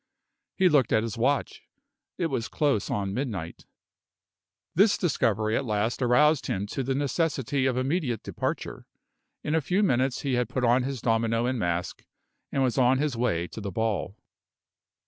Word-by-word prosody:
He 190 - +4
looked 145 -8 +3
at 110 - +3
his 115 -2 -4
watch. 135 +5 0 0.6
It 175 - -1
was 115 +2 -2
close 140 -9 0
on 100 -1 -2
midnight. 105 - -4 1.1
This 200 +5 +4
discovery 110 - +1
at - - 0
last 110 +1 -1
aroused 145 +4 +3
him 95 +1 -2
to - - -2
the 135 +1 -1
necessity 140 -2 0
of 125 -1 0
immediate 130 - -1
departure. - - -4 0.6
In 150 - -2
a 160 - +2
few 185 +8 +1
minutes 130 -7 +1
he 135 -2 -1
had 125 -2 0
put 130 0 -2
on 120 +2 +4
his 130 -1 -4
domino 115 0 +1
and 125 -1 -1
mask, 85 -1 -2 0.5
and 135 - +1
was 130 +1 +1
on 130 +1 +4
his 145 -2 -1
way 85 -8 0
to 110 - -8
the 100 - -4
ball. 105 -1 -2
125 Hz, 165 wpm, -27 LUFS, 110-140 Hz, 1.1 s, He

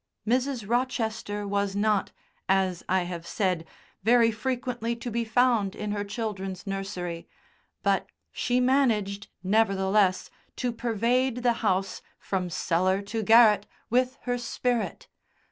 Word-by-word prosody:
Mrs. 250 -2 0
Rochester 225 -4 -1
was 200 0 -1
not, 205 -1 +1 0.4
as 190 -2 +1
I 190 0 +3
have 175 -1 -6
said, 180 -5 -1 0.3
very 230 +2 +5
frequently 240 0 -2
to 235 +1 -6
be 235 +1 0
found 230 -3 +2
in 210 -1 -4
her 205 0 -1
children's 200 -3 -4
nursery, 185 -4 -4 0.6
but - - +1 0.2
she 245 0 0
managed, 225 -6 +1 0.2
nevertheless, 195 -1 +2 0.2
to 245 - -1
pervade 240 +2 0
the 240 -1 +4
house, 195 -3 0 0.2
from 185 -2 -2
cellar 185 +4 +1
to 220 +3 -3
garret, 220 -1 +6 0.2
with 255 +2 +2
her 245 0 -1
spirit. 240 0 -2
215 Hz, 125 wpm, -27 LUFS, 195-240 Hz, 0.6 s, garret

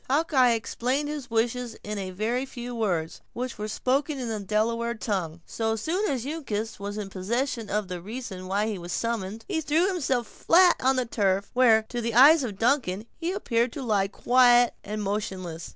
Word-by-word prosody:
Hawkeye 270 -4 +3
explained 255 +5 -1
his 295 -4 -5
wishes 235 +1 -1
in 210 0 -4
a 190 -1 -4
very 220 +7 -1
few 245 -2 -7
words, 180 -9 -2
which 250 -2 -5
were 210 - -3
spoken 275 +6 0
in 250 -3 -4
the 220 -1 -2
Delaware 230 +4 0
tongue. 180 -7 -3
So 225 -1 -1
soon 345 - -1
as 260 -3 -2
Uncas 225 -9 -4
was 205 +1 -5
in 200 -2 -5
possession 230 +4 -2
of 210 0 -1
the 180 -1 -5
reason 200 -3 -7
why 200 +3 0
he 215 -3 -3
was 175 0 -7
summoned, 225 -2 -3
he 345 -5 -1
threw 315 +4 +2
himself 265 -10 0
flat 355 +7 +4
on 265 +1 +2
the 255 -1 0
turf; 200 -3 0
where, 230 -3 +5
to 240 -1 -3
the 230 -1 -2
eyes 285 +4 +8
of 210 -6 -4
Duncan, 225 -4 +1
he 340 +1 -3
appeared 240 - 0
to 280 - -5
lie 205 -5 +1
quiet 245 +2 +4
and 210 +1 -4
motionless. 190 -5 -4
230 Hz, 190 wpm, -26 LUFS, 205-255 Hz, -, eyes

